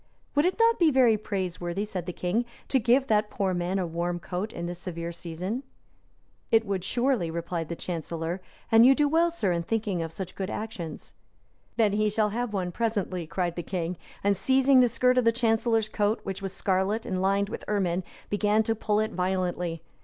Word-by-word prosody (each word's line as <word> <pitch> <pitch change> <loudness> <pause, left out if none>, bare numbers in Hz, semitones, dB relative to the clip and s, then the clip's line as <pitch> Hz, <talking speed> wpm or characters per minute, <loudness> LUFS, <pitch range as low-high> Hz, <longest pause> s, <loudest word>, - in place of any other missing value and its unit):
"Would 290 +2 +3
it 365 - +1
not 460 0 +4
be 335 -3 +6
very 255 -5 +5
praiseworthy," 190 -2 -3
said 185 -4 -5
the - - -1
king, 180 +7 0 0.3
"to 265 - +3
give 250 +3 +3
that 210 -4 +2
poor 195 -2 -1
man 175 +2 -1
a 185 - 0
warm 170 +1 -2
coat 185 +5 -4
in 170 - -5
this 175 0 -5
severe 170 -2 -5
season?" 175 +7 -4 0.9
"It 225 0 +4
would, 195 -3 -2
surely," 240 -5 +1
replied 170 0 -3
the 170 - -3
chancellor; 165 +1 -4 0.3
"and 225 0 +8
you 265 +2 +7
do 295 0 +3
well, 330 +3 +3
sir, 225 - -1
in 170 -1 0
thinking 205 -1 -1
of 165 -1 -4
such 185 +1 -6
good 190 0 -4
actions." 185 -8 -6 0.6
"Then 215 -3 +3
he 215 +1 +2
shall 210 0 +1
have 240 +2 -2
one 185 -3 -2
presently," 195 -5 -2
cried 175 0 -2
the 175 - -3
king; 175 0 -3 0.3
and 200 0 +3
seizing 265 +6 +4
the 250 -1 +5
skirt 250 +2 +3
of - - +2
the 230 - +5
chancellor's 225 -1 +2
coat, 215 +1 0
which 195 -1 -5
was 195 -1 -4
scarlet, 195 +3 0
and 185 -1 -2
lined 200 +1 +2
with - - -6
ermine, 185 -3 0 0.3
began 210 +1 +3
to 225 - +1
pull 210 -1 0
it 215 +1 0
violently. 180 -3 -1
200 Hz, 200 wpm, -27 LUFS, 175-225 Hz, 0.9 s, and